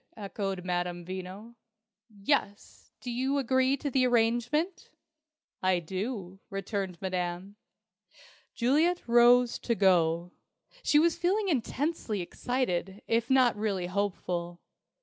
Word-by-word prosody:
echoed 195 Hz, -3 st, -4 dB
Madame 175 Hz, -1 st, -2 dB
Veno. 190 Hz, +5 st, -7 dB, 0.6 s
"Yes. 205 Hz, 0 st, -2 dB
Do 245 Hz, -, -5 dB
you 260 Hz, +4 st, 0 dB
agree 260 Hz, +1 st, +2 dB
to 285 Hz, +1 st, -4 dB
the 255 Hz, 0 st, +3 dB
arrangement?" 240 Hz, +9 st, +1 dB, 0.7 s
"I 185 Hz, -1 st, +3 dB
do," 190 Hz, +2 st, -5 dB
returned 195 Hz, -3 st, -4 dB
Madame. 185 Hz, +1 st, -3 dB, 1.0 s
Juliet 310 Hz, +9 st, +2 dB
rose 240 Hz, +1 st, +5 dB
to 235 Hz, -, -1 dB
go. 175 Hz, -3 st, +2 dB, 0.5 s
She 295 Hz, -, +3 dB
was 330 Hz, +2 st, +3 dB
feeling 390 Hz, +3 st, +1 dB
intensely 275 Hz, -, -1 dB
excited, 190 Hz, -1 st, -2 dB
if 230 Hz, +1 st, +1 dB
not 260 Hz, -3 st, +4 dB
really 205 Hz, -4 st, -1 dB
hopeful. 175 Hz, -2 st, -3 dB
210 Hz, 110 wpm, -29 LUFS, 185-255 Hz, 1.0 s, rose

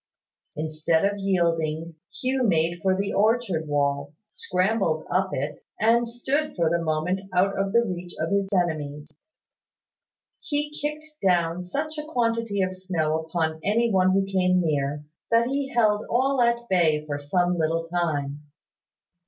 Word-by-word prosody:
Instead 155 Hz, +3 st, 0 dB
of 200 Hz, 0 st, 0 dB
yielding, 165 Hz, -4 st, 0 dB, 0.2 s
Hugh 260 Hz, +3 st, -1 dB
made 170 Hz, -1 st, +1 dB
for 190 Hz, +1 st, +2 dB
the 200 Hz, +1 st, -1 dB
orchard 210 Hz, -7 st, +1 dB
wall, 140 Hz, 0 st, 0 dB
scrambled 185 Hz, -5 st, 0 dB
up 190 Hz, +1 st, +2 dB
it, 140 Hz, +3 st, -3 dB, 0.2 s
and 230 Hz, +2 st, +3 dB
stood 280 Hz, +6 st, -1 dB
for 165 Hz, -3 st, +1 dB
the 170 Hz, 0 st, +1 dB
moment 160 Hz, +4 st, 0 dB
out 195 Hz, +2 st, +3 dB
of 195 Hz, 0 st, -1 dB
the 235 Hz, +2 st, +4 dB
reach 180 Hz, -3 st, -5 dB
of 160 Hz, +3 st, -1 dB
his 200 Hz, -1 st, +1 dB
enemies. 155 Hz, -5 st, -1 dB, 1.3 s
He 295 Hz, -1 st, -2 dB
kicked 305 Hz, +1 st, -5 dB
down 175 Hz, -2 st, +2 dB
such 300 Hz, -, -4 dB
a -, -, -4 dB
quantity 230 Hz, -7 st, 0 dB
of 185 Hz, 0 st, -1 dB
snow 165 Hz, -4 st, -1 dB
upon 160 Hz, -1 st, -2 dB
any 230 Hz, +3 st, +2 dB
one 185 Hz, -1 st, +3 dB
who 195 Hz, 0 st, +2 dB
came 185 Hz, -1 st, +2 dB
near, 145 Hz, -3 st, -1 dB, 0.3 s
that 230 Hz, 0 st, +4 dB
he 270 Hz, +2 st, -1 dB
held 215 Hz, -3 st, +3 dB
all 260 Hz, +2 st, +2 dB
at 235 Hz, 0 st, +1 dB
bay 160 Hz, -6 st, +2 dB
for 145 Hz, -1 st, -3 dB
some 175 Hz, +4 st, 0 dB
little 165 Hz, +1 st, 0 dB
time. 150 Hz, -5 st, -1 dB
185 Hz, 150 wpm, -25 LUFS, 160-230 Hz, 1.3 s, the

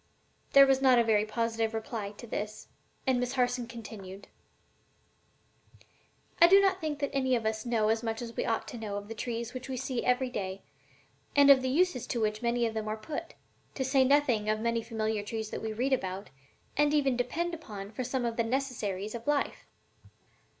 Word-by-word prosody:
There 275 Hz, 0 st, +9 dB
was 270 Hz, -1 st, +3 dB
not 260 Hz, -2 st, +6 dB
a 235 Hz, -, +5 dB
very 215 Hz, -2 st, +3 dB
positive 225 Hz, 0 st, -1 dB
reply 220 Hz, -2 st, -4 dB
to 225 Hz, -, -11 dB
this; 215 Hz, -1 st, -5 dB, 0.4 s
and 260 Hz, -2 st, +2 dB
Miss 250 Hz, +1 st, -1 dB
Harson 245 Hz, -2 st, 0 dB
continued: 205 Hz, -4 st, -9 dB, 2.1 s
"I 340 Hz, -, +10 dB
do 390 Hz, +3 st, +8 dB
not 390 Hz, -1 st, +2 dB
think 305 Hz, -2 st, -2 dB
that 280 Hz, -1 st, -3 dB
any 260 Hz, -2 st, +2 dB
of 230 Hz, -2 st, -2 dB
us 220 Hz, +2 st, -2 dB
know 220 Hz, -3 st, +2 dB
as 225 Hz, 0 st, +1 dB
much 225 Hz, -1 st, -3 dB
as 235 Hz, -1 st, -7 dB
we -, -, -1 dB
ought 225 Hz, -, -1 dB
to 240 Hz, -, -7 dB
know 205 Hz, -2 st, -4 dB
of 205 Hz, +1 st, -7 dB
the -, -, -4 dB
trees 235 Hz, +1 st, -4 dB
which 255 Hz, +1 st, -7 dB
we 260 Hz, -, -3 dB
see 255 Hz, -1 st, -2 dB
every 250 Hz, 0 st, +1 dB
day, 190 Hz, -3 st, -4 dB, 0.7 s
and 285 Hz, -1 st, +8 dB
of 265 Hz, -2 st, +7 dB
the 260 Hz, -, -1 dB
uses 315 Hz, -2 st, +1 dB
to 240 Hz, -, -2 dB
which 215 Hz, -1 st, 0 dB
many 240 Hz, 0 st, +1 dB
of 225 Hz, -, -1 dB
them 220 Hz, -1 st, -3 dB
are 215 Hz, +1 st, -2 dB
put, 310 Hz, +9 st, -6 dB, 0.4 s
to 265 Hz, -, -1 dB
say 265 Hz, 0 st, +4 dB
nothing 260 Hz, -6 st, +3 dB
of 215 Hz, 0 st, +1 dB
many 230 Hz, +1 st, 0 dB
familiar 220 Hz, -2 st, -2 dB
trees 220 Hz, +1 st, -5 dB
that -, -, -4 dB
we 220 Hz, -, -3 dB
read 250 Hz, +5 st, 0 dB
about, 190 Hz, -, -3 dB, 0.4 s
and 295 Hz, +1 st, +3 dB
even 275 Hz, -3 st, +2 dB
depend 320 Hz, +8 st, -1 dB
upon 210 Hz, -11 st, -7 dB
for 240 Hz, +4 st, -4 dB
some 250 Hz, 0 st, -2 dB
of 230 Hz, -1 st, -2 dB
the 230 Hz, -, +2 dB
necessaries 225 Hz, -6 st, -2 dB
of 235 Hz, +1 st, -7 dB
life." 295 Hz, -1 st, 0 dB
235 Hz, 205 wpm, -30 LUFS, 220-265 Hz, 2.1 s, I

